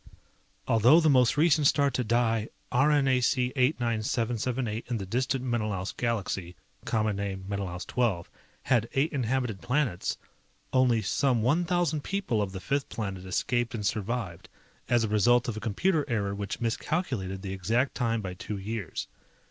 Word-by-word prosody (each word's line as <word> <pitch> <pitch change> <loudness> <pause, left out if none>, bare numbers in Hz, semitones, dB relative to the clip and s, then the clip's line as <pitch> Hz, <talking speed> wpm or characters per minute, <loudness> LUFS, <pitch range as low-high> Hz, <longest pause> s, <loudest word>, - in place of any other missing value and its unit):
although 120 +8 +6
the 160 -3 +4
most 125 0 +4
recent 150 -2 +4
star 140 -1 +3
to 125 - -1
die, 115 -1 +1 0.2
RNAC 130 -2 +3
89778 120 -2 0
in 120 - 0
the 100 - -5
distant 125 +5 -1
Menelaus 105 -6 -2
galaxy 100 -6 -2 0.3
(common 110 -2 0
name, 95 -1 -4
Menelaus 100 -3 -4
XII), 115 -9 0 0.4
had 115 -3 +2
eight 140 +4 +1
inhabited 125 -5 -1
planets, 125 -8 -1 0.6
only 125 -4 +3
some 125 -5 +1
one 155 +9 +2
thousand 170 -4 0
people 190 - -1
of 100 -2 -2
the 95 - -6
fifth 140 +10 -2
planet 95 -4 -5
escaped 120 +4 0
and 105 -3 -4
survived 105 -4 -3 0.4
as 120 -1 +3
a - - +1
result 115 +3 +3
of 120 - -2
a - - -4
computer 150 - +1
error 100 -5 -1
which 100 0 -4
miscalculated 115 - -2
the 95 -1 -4
exact 115 +8 0
time 115 -3 0
by 95 -2 -5
two 100 +3 -6
years. 100 -1 -4
115 Hz, 150 wpm, -28 LUFS, 105-130 Hz, 0.6 s, although